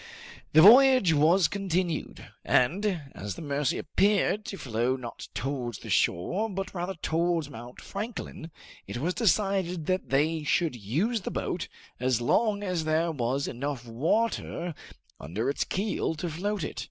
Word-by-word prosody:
The 155 +1 +8
voyage 255 -4 +8
was 160 +4 +4
continued, 185 -2 -2 0.2
and 175 +6 +1
as 100 0 -6
the - - -8
Mercy 145 -1 0
appeared 205 +4 +1
to 195 - -6
flow 125 -3 -1
not 125 -3 -8
towards 125 -4 -3
the - - -8
shore, 185 - +1
but 195 -1 -4
rather 185 +1 -3
towards 165 -2 0
Mount 120 0 -10
Franklin, 200 -5 -6 0.4
it - - -5
was 165 +9 -1
decided 190 -5 +1
that 185 +2 -1
they 155 +4 +1
should 155 0 +1
use 160 - -1
the - - -4
boat - - -3 0.3
as 125 -1 +1
long 205 - +1
as 180 -4 -1
there 160 +2 +1
was 135 -1 -1
enough 130 0 -4
water 170 - -1 0.5
under 105 - -2
its - - -1
keel 195 -4 -2
to 165 +2 -4
float 200 +3 -2
it. 130 - -5
165 Hz, 150 wpm, -28 LUFS, 135-195 Hz, 0.5 s, The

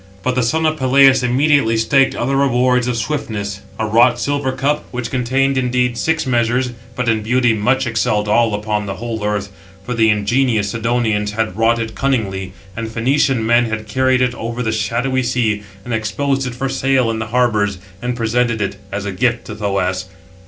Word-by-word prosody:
But 125 - 0
the 125 - +1
son 160 +7 0
of 155 0 +1
Peleus 135 0 +5
immediately 125 -1 +2
staked 135 +4 +3
other 135 +3 -1
rewards 125 -2 +2
of 125 -2 -1
swiftness, 110 -7 -3 0.2
a 110 - -1
wrought 120 +3 +4
silver 140 0 -1
cup, 145 +3 -1
which 125 -2 -5
contained, 130 +2 +1
indeed, 125 -1 0
six 160 +6 0
measures, 120 0 +1 0.2
but 125 0 -2
in 110 -1 +2
beauty 120 +1 +2
much 125 +6 +1
excelled 110 -2 0
[all] 110 0 +2
upon 105 0 -2
the 95 - -4
whole 115 -2 -5
earth, 105 -1 -2 0.3
for 125 - -3
the 110 -2 +3
ingenious 105 0 +1
Sidonians 115 -3 0
had 110 -4 -2
wrought 115 +2 +2
it 115 -1 -4
cunningly, 100 -6 -1 0.2
and 115 0 -4
Phœnician 125 +2 +1
men 120 +2 +3
had 110 -1 -4
carried 130 +1 +2
it 125 -1 0
over 120 +1 -4
the 110 - 0
shadowy 120 +5 0
sea, 120 -4 0 0.2
and 120 - -4
exposed 135 +5 -1
it 125 - -6
for 135 +2 -2
sale 135 -2 +1
in 110 - -3
the 110 - -4
harbours, 110 -4 +1 0.2
and 125 0 -2
presented 120 0 0
it 100 -1 -2
as 100 +1 -4
a 100 - -2
gift 120 +4 0
to 105 - -7
Thoas. 95 -3 -1
120 Hz, 190 wpm, -18 LUFS, 110-130 Hz, 0.3 s, Peleus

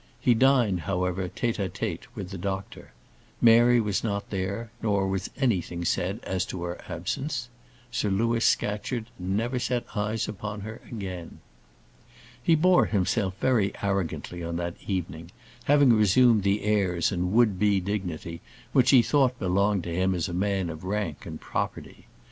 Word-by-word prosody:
He 125 - +4
dined, 120 -6 +3
however, 90 +1 -2
tête 120 +3 -2
à 100 -3 -1
tête - - -4
with 95 -1 -6
the 95 - -5
doctor. 95 +1 -5 0.5
Mary 120 +1 +6
was 105 -4 0
not 100 -3 -3
there, 100 +4 -3
nor 100 -3 +1
was 95 0 -2
anything 90 - 0
said 95 +5 0
as 95 -1 -1
to 90 - -5
her 85 0 -5
absence. 120 - -3 0.4
Sir 105 - 0
Louis 115 +4 +1
Scatcherd 110 +3 0
never 110 +8 -1
set 125 -1 -1
eyes 105 +1 -1
upon 105 0 -5
her 110 +3 -8
again. 95 -6 -6 1.0
He 165 +6 +4
bore 180 +3 +4
himself 95 -1 0
very 110 -7 +2
arrogantly 90 -3 -2
on 85 0 -3
that 85 0 -2
evening, 85 -4 -3 0.4
having 145 -3 +5
resumed 110 +2 +5
the 100 +2 +1
airs 95 -5 +1
and 90 -1 -1
would 110 -5 +3
be 105 -2 +3
dignity 90 -4 -4 0.3
which 130 - +4
he 130 -4 +7
thought 130 -3 +2
belonged 100 0 +1
to 85 - -4
him 95 +2 +1
as 85 - -1
a 90 - -5
man 95 -1 0
of 80 +1 -9
rank 95 -5 -3
and - - -7
property. - - -5
100 Hz, 160 wpm, -27 LUFS, 90-115 Hz, 1.0 s, he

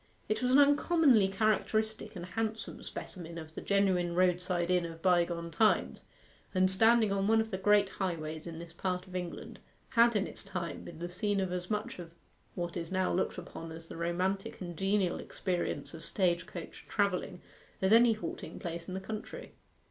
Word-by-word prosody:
It 215 - 0
was 250 0 +1
an 260 - +7
uncommonly 285 - +5
characteristic 215 +2 0
and 175 -1 -6
handsome 220 +4 -3
specimen 170 -3 -7
of 160 -1 -8
the - - -6
genuine 185 -4 +2
roadside 180 -1 +2
inn 180 -1 +3
of 165 -1 -7
bygone 170 -2 +2
times; 215 +5 +2 0.5
and 185 0 +5
standing 225 +2 +5
on 195 0 +1
one 225 +1 +5
of 220 0 -1
the 190 - -2
great 205 0 +4
highways 160 -5 -4
in 165 -1 -6
this 170 0 -9
part 180 +1 -2
of 185 -1 -11
England, 180 -2 -5 0.3
had 235 -2 +5
in 200 - +2
its - - -6
time 170 -5 -5
been 170 - -9
the 175 +2 -4
scene 200 +3 -1
of 190 -2 -1
as 180 0 -4
much 210 -3 -3
of 170 -1 -9 0.4
what 175 -1 -3
is 170 -1 -4
now 185 -1 +1
looked 185 - 0
upon 165 0 -8
as 165 0 -9
the - - -7
romantic 180 +4 -1
and 175 -2 -6
genial 195 -1 +1
experience 180 -3 -3
of 160 - -9
stage 180 -2 0
coach 170 -2 -8
travelling 195 -3 0 0.4
as 190 +2 +3
any 230 0 +7
halting 215 - -6
place 170 -1 -5
in 185 - -5
the - - -2
country. 215 +2 -7
185 Hz, 185 wpm, -32 LUFS, 175-210 Hz, 0.5 s, an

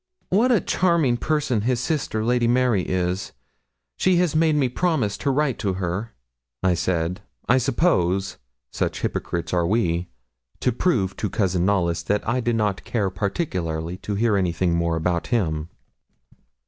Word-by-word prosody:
'What 225 +7 +3
a 230 - +5
charming 165 -10 +2
person 135 -5 0
his 120 +2 0
sister, 125 -6 -1
Lady 120 0 +2
Mary, 120 -4 +3
is. 90 +1 -2 0.6
She 185 -1 +3
has 175 -3 +2
made 155 -1 +3
me 140 -3 +2
promise 125 - 0
to 140 - 0
write 135 -2 +1
to 100 -2 0
her,' 95 +4 -3 0.5
I 95 -1 +4
said, 85 +2 -1 0.3
I 125 +2 +4
suppose 100 - +1 0.3
such - - -2
hypocrites 85 0 -3
are 85 -1 +2
we 90 -4 0 0.5
to 125 - +1
prove 110 - 0
to 105 - -2
Cousin 95 -4 0
Knollys 85 -4 +1
that 105 +1 0
I 130 - +1
did 120 -1 0
not 105 -3 0
care 100 -5 -1
particularly 90 - -2
to 100 +1 -4
hear 110 0 +2
anything 90 -1 +1
more 85 0 +1
about 85 +1 -1
him. 80 -10 -1
105 Hz, 155 wpm, -23 LUFS, 90-130 Hz, 0.6 s, a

